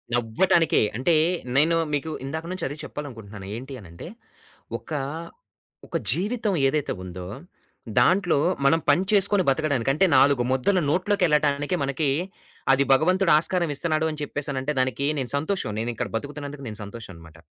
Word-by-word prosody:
నవ్వటానికే. 160 +9 +2 0.2
అంటే, 160 +6 +2 0.4
నేను 160 +3 +4 0.2
మీకు 145 +2 -1
ఇందాకల 160 +5 -5
నుంచి 185 - -3
అదే 140 - -6
చెప్పాలనుకుంటున్నాను. 110 -9 -8
ఏంటి 135 +2 -8
అనంటే, 85 - -11 0.7
ఒకా 145 +6 -5 0.9
ఒక - - -4 0.2
జీవితం 210 +2 -1
ఏదైతే 150 +1 -1
ఉందో, 90 0 -7 0.7
దాంట్లో 180 +5 +3 0.3
మనం 160 +4 +4
పని 180 - +4
చేసుకొని 200 -1 +4
బతకడానికి 135 -3 +1
అంటే 190 +7 +3
నాలుగు 135 -1 +5
ముద్దలు 130 +9 +2
నోట్లోకెళ్ళటానికే 155 -4 +1
మనకి 140 +2 0 0.6
అది 135 +1 +4
భగవంతుడు 180 +6 +3
ఆస్కారం 170 0 0
ఇస్తున్నాడు 155 +1 0
అని 155 -1 -7
చెప్పేసనంటే, 145 0 -2
దానికి 130 +1 0
నేను 130 -3 -3
సంతోషం. 160 - -2
నేనిక్కడ 115 +1 -3
బతుకుతున్నందుకు 145 +2 -6
నేను 105 -2 -5
సంతోషం 105 -1 -9
అనమాట. 80 -1 -15
145 Hz, 135 wpm, -24 LUFS, 130-165 Hz, 0.9 s, నాలుగు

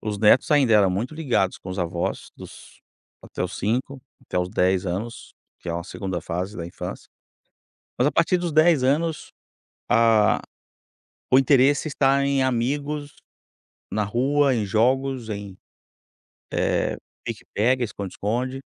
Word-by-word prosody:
os 105 -1 -3
netos 110 +4 +4
ainda 135 -6 +4
eram 105 -2 +5
muito 115 +11 -3
ligados 125 - 0
com 95 - -11
os 95 0 -4
avós, 85 0 -3
dos - - -13 0.4
até - - -6
os 90 - -4
5 130 +5 -2 0.2
até 100 - -3
os 90 0 -1
10 95 +1 +1
anos, 110 +7 -5 0.3
que 90 - -8
é - - -1
uma 85 - -3
2º 95 0 -5
fase 90 +4 -4
da 85 - -5
infância. 85 - -7 0.9
Mas 125 - +3
a - - +2
partir 180 +2 +2
dos 175 -2 -3
10 155 -2 +4
anos, 150 +4 0 0.6
a 115 -3 +4 0.9
o 130 - +7
interesse 135 +2 +4
está 140 -1 +2
em 140 -1 +1
amigos, 145 +4 -2 0.8
na 105 - 0
rua, 135 +6 +2
em 110 -3 -1
jogos, 125 +3 +1
em, 100 -2 -6 1.1
eh, - - 0 0.3
pique-pega, 125 +4 -1
esconde-esconde. 115 +6 -3
120 Hz, 140 wpm, -23 LUFS, 100-135 Hz, 1.1 s, o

